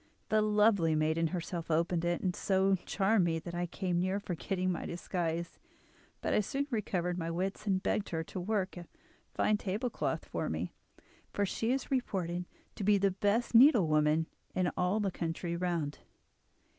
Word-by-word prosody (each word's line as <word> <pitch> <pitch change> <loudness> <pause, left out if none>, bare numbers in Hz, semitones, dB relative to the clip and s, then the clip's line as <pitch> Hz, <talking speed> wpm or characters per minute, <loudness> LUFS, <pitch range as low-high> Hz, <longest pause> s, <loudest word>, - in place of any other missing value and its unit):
The 215 0 +4
lovely 210 -6 +3
maiden 160 +2 +2
herself 170 0 -4
opened 165 +1 +1
it, 175 0 0
and 180 -2 -1
so 195 0 +2
charmed 200 0 +3
me 165 -1 +1
that 170 +2 -7
I 175 0 -1
came 175 0 -1
near 185 +2 0
forgetting 185 0 -2
my 175 - -3
disguise; 170 -1 -3 0.6
but - - 0
I - - +4
soon 275 +7 -1
recovered 180 -5 -1
my 165 -1 -2
wits, 190 +5 -3
and 190 -1 +1
begged 210 - 0
her 165 -1 -2
to 185 - -6
work 190 -1 -1
a 175 - -8 0.5
fine 215 - +2
table 210 +5 -2
cloth - - -2
for - - -3
me, - - -3 0.6
for 205 - 0
she 225 +4 -1
is 265 +1 -2
reported 180 -9 -1 0.3
to - - -3
be 205 +1 +5
the 195 0 +2
best 205 +6 0
needlewoman 160 - +5 0.3
in 180 -1 +1
all 180 +4 +1
the 200 -2 0
country 170 0 -3
round. 170 -4 -2
185 Hz, 170 wpm, -32 LUFS, 170-205 Hz, 0.6 s, be